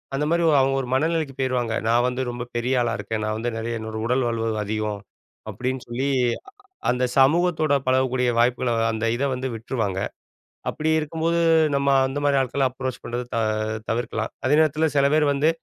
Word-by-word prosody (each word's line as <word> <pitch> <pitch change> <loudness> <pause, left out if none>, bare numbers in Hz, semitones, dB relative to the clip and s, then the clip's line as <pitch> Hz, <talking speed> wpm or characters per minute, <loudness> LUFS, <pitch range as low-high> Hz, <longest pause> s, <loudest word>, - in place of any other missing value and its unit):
அந்த 145 +2 0
மாரி 170 +1 +2 0.2
அவுங்க 135 0 +2
ஒரு 125 - -6
மனநிலைக்கு 155 +1 0
போயிருவாங்க. 125 -3 0
"நான் 120 +1 +3
வந்து 125 +1 -2
ரொம்ப 120 0 -4
பெரிய 120 +2 0
ஆளா 120 -1 0
இருக்கேன். 110 -1 -4
நான் 110 0 -1
வந்து 120 +2 -2
நெறைய 115 +1 -3
என்னோட 110 0 -6
உடல் 125 +2 +1
வலுவு 115 -1 -1
அதிகம்." 105 0 -2 0.5
அப்டீன்னு 130 0 -3
சொல்லி, 125 +4 -2 0.8
அந்த 125 +1 +1
சமூகத்தோட 155 +1 +3
பழகக்கூடிய 130 -1 +2
வாய்ப்புகள, 120 +1 +2 0.2
அந்த 110 0 -3
இத 140 - -1
வந்து 130 +1 -3
விட்ருவாங்க. 110 -4 -3 0.7
அப்படி 155 +1 -2
இருக்கும்போது, 165 +2 -1 0.4
நம்ம 140 0 0 0.2
அந்த 135 +2 -5
மாரி 140 -1 +3
ஆட்கள 135 +1 0
அப்ரோச் 130 0 -5
பண்ணுறது 120 +1 -4
த - - 0 0.5
தவிர்க்கலாம். 115 -1 -2
அதே 135 +3 +4
நேரத்தில 155 +1 +2
சில 140 - +4
பேர் 155 0 +4
வந்து 145 +3 +2
130 Hz, 170 wpm, -23 LUFS, 120-140 Hz, 0.8 s, அதே